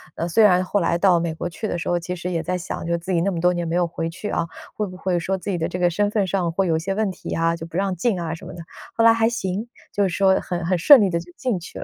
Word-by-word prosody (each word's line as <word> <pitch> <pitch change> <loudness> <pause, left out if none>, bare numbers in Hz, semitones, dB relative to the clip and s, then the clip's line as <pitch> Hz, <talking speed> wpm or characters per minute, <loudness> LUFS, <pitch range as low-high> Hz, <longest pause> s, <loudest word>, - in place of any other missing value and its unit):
呃， 170 - -2
虽 215 +6 +4
然 185 -3 +5
后 205 +2 0
来 170 -1 +1
到 180 -1 +4
美 165 -1 -2
国 160 - -4
去 215 +6 -5
的 175 - -2
时 165 - -5
候， 175 0 +1
其 180 +2 -5
实 180 +1 -4
也 165 - -1
在 180 +3 -2
想 175 - -5
就 170 - 0
是 - - +1
自 175 +3 -6
己 170 - +2
那 195 - +1
么 170 - -3
多 180 +1 +3
年 175 -1 -2
没 165 - -2
有 175 0 +3
回 165 -1 -4
去 195 +5 -6
啊， 170 - -1 0.3
会 210 -1 -2
不 185 - -10
会 185 -1 0
说 190 +3 -1
自 200 - -4
己 180 - -1
的 165 -1 -1
这 180 - -5
个 180 -1 +3
身 205 +4 +1
份 210 -1 +1
上 185 -2 -1
会 190 +3 0
有 165 - +2
一 - - -1
些 195 +4 -3
问 210 -2 0
题 180 - -7
啊， 165 0 +1
就 165 0 -8
不 165 - -6
让 195 -1 0
进 190 +2 0
啊 165 -2 -3
什 165 - -9
么 - - -8
的。 170 0 -8 0.3
后 230 - +2
来 230 - +8
还 225 0 +2
行， 210 -2 -3 0.2
就 205 - -1
是 195 - +2
说 190 +2 +3
很 175 -1 -4
很 180 +1 +1
顺 265 - +8
利 200 - +3
地 170 -1 0
就 175 +1 -11
进 245 -8 -1
去 175 - -10
了。 - - -5
180 Hz, 370 characters per minute, -22 LUFS, 170-195 Hz, 0.3 s, 来